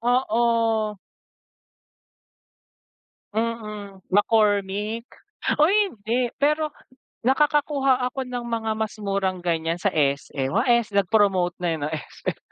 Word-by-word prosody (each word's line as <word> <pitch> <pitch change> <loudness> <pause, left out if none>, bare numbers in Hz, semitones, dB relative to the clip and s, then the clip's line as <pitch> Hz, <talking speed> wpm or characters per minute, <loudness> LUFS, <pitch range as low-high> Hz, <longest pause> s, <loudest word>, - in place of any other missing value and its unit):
Oo. 230 -3 +1 2.4
Mm, 210 -4 -4
McCormick. 205 +2 +1 0.5
Uy, 315 +7 +4 0.2
hindi 235 +3 -1
pero 300 +2 +2 0.5
nakakakuha 275 0 +2
ako 265 +2 -4
ng 245 -1 -4
mga 225 -1 -2
mas 220 -1 -2
murang 195 -2 -1
ganyan 165 0 -1
sa 200 +2 +1
SM. 140 -2 0
Wa, 230 - +3
S 235 -2 +3
nag-promote 195 -3 +3
na, 175 - -1
eh, - - -4
'no 145 +1 -2
SM 155 -2 -5
220 Hz, 105 wpm, -24 LUFS, 195-240 Hz, 2.4 s, Uy